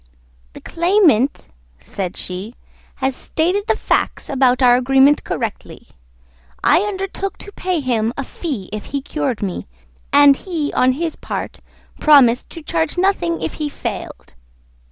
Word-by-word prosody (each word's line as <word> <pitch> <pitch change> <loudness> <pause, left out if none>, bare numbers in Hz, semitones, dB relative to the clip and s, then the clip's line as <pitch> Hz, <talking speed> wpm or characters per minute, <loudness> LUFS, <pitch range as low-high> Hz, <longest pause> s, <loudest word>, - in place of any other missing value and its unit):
"The - - -11
claimant," 335 - +2 0.3
said 180 - -6
she, 190 +6 -6 0.4
"has 265 -1 -1
stated 365 +10 -1
the - - +2
facts - - -1
about 260 -1 +2
our 245 -1 +6
agreement 270 +3 +4
correctly. - - -5 0.7
I - - +5
undertook 390 -1 -4
to 405 - -10
pay 365 -4 -2
him 230 -4 0
a 275 - -2
fee 265 - -5
if 215 - -5
he 280 -1 -4
cured 275 -8 -2
me, 185 - -4 0.4
and 285 -1 +7
he, 330 -6 -3
on 255 0 +3
his 325 +3 -3
part, - - -6 0.4
promised 260 -5 +5
to 330 - -10
charge 165 - -1
nothing 355 -3 0
if - - -3
he 300 - -1
failed. - - -7
280 Hz, 140 wpm, -19 LUFS, 245-340 Hz, 0.7 s, and